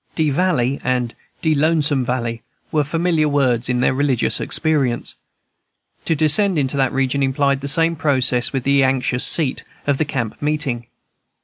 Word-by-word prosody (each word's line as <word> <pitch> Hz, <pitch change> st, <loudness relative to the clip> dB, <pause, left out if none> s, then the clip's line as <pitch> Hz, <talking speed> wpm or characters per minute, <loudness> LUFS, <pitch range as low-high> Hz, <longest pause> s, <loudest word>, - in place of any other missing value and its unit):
"De 155 Hz, -3 st, +1 dB
valley" 140 Hz, -5 st, +1 dB
and 125 Hz, -2 st, -1 dB, 0.3 s
"de 160 Hz, -1 st, +3 dB
lonesome 150 Hz, -2 st, +1 dB
valley" 120 Hz, -2 st, -3 dB, 0.3 s
were 150 Hz, -1 st, +2 dB
familiar 160 Hz, 0 st, 0 dB
words 130 Hz, -4 st, +1 dB
in 125 Hz, 0 st, +1 dB
their -, -, +2 dB
religious 135 Hz, -3 st, +1 dB
experience. 145 Hz, -7 st, 0 dB, 0.9 s
To 165 Hz, -, +1 dB
descend 165 Hz, +5 st, +2 dB
into 140 Hz, -1 st, 0 dB
that 135 Hz, -1 st, +1 dB
region 135 Hz, +1 st, 0 dB
implied 140 Hz, 0 st, +1 dB
the 140 Hz, -, -4 dB
same 165 Hz, +4 st, +2 dB
process 130 Hz, -5 st, +1 dB
with 135 Hz, -3 st, -2 dB
the 140 Hz, +1 st, +3 dB
"anxious 130 Hz, -1 st, 0 dB
seat" 150 Hz, -6 st, +1 dB, 0.2 s
of 140 Hz, -2 st, 0 dB
the 155 Hz, -, +1 dB
camp 120 Hz, -6 st, -4 dB
meeting. 145 Hz, -6 st, -2 dB
140 Hz, 155 wpm, -19 LUFS, 130-155 Hz, 0.9 s, de